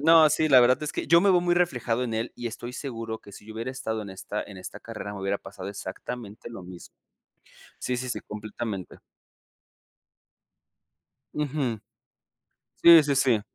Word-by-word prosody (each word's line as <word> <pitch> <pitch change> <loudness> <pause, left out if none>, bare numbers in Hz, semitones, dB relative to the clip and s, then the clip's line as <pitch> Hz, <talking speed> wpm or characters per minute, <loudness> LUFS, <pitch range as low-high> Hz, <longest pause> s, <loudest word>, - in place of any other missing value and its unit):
No, 160 0 +7
sí, 155 +1 +2
la 130 -3 +8
verdad 125 +1 +4
es 150 - -3
que - - -3
yo 170 +1 +7
me 200 - +3
veo 180 -2 +5
muy 175 0 +2
reflejado 125 -8 +1
en 115 -2 -3
él 115 +2 -2
y 120 - -4
estoy 120 +2 -7
seguro 115 -5 -5
que 100 - -14
si 105 - -12
yo 110 - -9
hubiera 115 +3 -3
estado 110 -4 -3
en 100 - -8
esta 95 +2 -5
en 100 - -11
esta 95 - -8
carrera 105 - -7
me 100 - -7
hubiera 100 +1 -1
pasado 95 0 -8
exactamente 105 +3 -7
lo 115 -6 -8
mismo. 90 -1 -11 0.9
Sí, 125 -1 -1
sí, 125 0 -4
sí, - - -2
completamente. 105 -2 -6 2.3
Ujú. 140 -6 -1 1.0
Sí, 170 -1 +10
sí, 145 -1 +1
sí. 130 -5 +3
120 Hz, 175 wpm, -27 LUFS, 105-140 Hz, 2.3 s, Sí